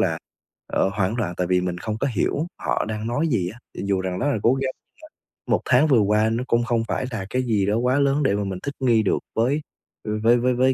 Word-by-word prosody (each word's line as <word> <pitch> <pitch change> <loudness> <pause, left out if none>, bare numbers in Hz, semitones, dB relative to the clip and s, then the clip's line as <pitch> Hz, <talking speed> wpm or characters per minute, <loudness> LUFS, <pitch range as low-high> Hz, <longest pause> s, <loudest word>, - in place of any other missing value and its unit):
là, - - +1 0.5
ờ, - - +1
hoảng 100 +2 0
loạn, 95 -7 -2
tại 90 - 0
vì 90 0 +2
mình 90 -1 -3
không 110 +3 -3
có 140 - +1
hiểu 145 - 0
họ - - 0
đang 110 0 -3
nói 145 +8 0
gì 95 -10 0
á. 120 - -15 0.2
Thì - - -5
dù 95 -1 +1
rằng 95 -1 -3
rất - - 0
là 115 - 0
cố 120 - +4
gắng, 135 -1 -2 0.8
1 - - +2
tháng 135 +5 +4
vừa 130 -6 +5
qua 105 +2 +3
nó 115 +3 -1
cũng 120 0 +2
không 120 -2 0
phải - - -1
là 100 -4 -4
cái 130 +3 0
gì 105 -5 +1
đó 105 +2 +1
quá 125 +3 +2
lớn 140 +1 +2
để 115 -7 +2
mà 105 - -1
mình 95 -2 -4
thích 140 - -3
nghi 115 -4 +3
được - - +1 0.2
với, 130 +7 +1 0.4
ừ, 105 0 -2
với 120 +2 +5
với 125 +1 +2
với 130 +2 +3
115 Hz, 265 wpm, -23 LUFS, 100-130 Hz, 0.8 s, vừa